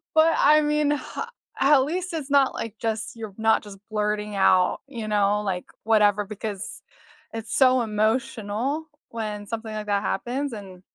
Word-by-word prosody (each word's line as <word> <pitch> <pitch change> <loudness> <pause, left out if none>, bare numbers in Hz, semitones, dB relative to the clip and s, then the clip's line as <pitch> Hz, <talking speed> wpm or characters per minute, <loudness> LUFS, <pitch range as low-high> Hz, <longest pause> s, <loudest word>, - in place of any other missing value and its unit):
But 320 +1 +5
I 305 +1 +6
mean, 300 0 +1
h 295 - -3 0.6
at 275 -1 +6
least 360 +5 -3
it's 300 -4 -4
not 280 -2 +4
like 225 -2 -5
just 225 +2 -3
you're 220 -3 -7
not 220 0 +3
just 200 -1 -11
blurting 210 -1 -1
out, 185 -2 +4
you 235 -6 -6
know, 210 0 +2
like, 185 -3 -2 0.2
whatever, 210 -2 +4
because 205 -1 -6 0.5
it's 225 -1 -5
so 255 -2 +5
emotional 220 +5 -1 0.2
when 210 -2 -5
something 220 0 -5
like 210 -1 -5
that 200 -1 +1
happens 260 +5 -2
and, 190 -4 -9
220 Hz, 160 wpm, -25 LUFS, 210-270 Hz, 0.6 s, I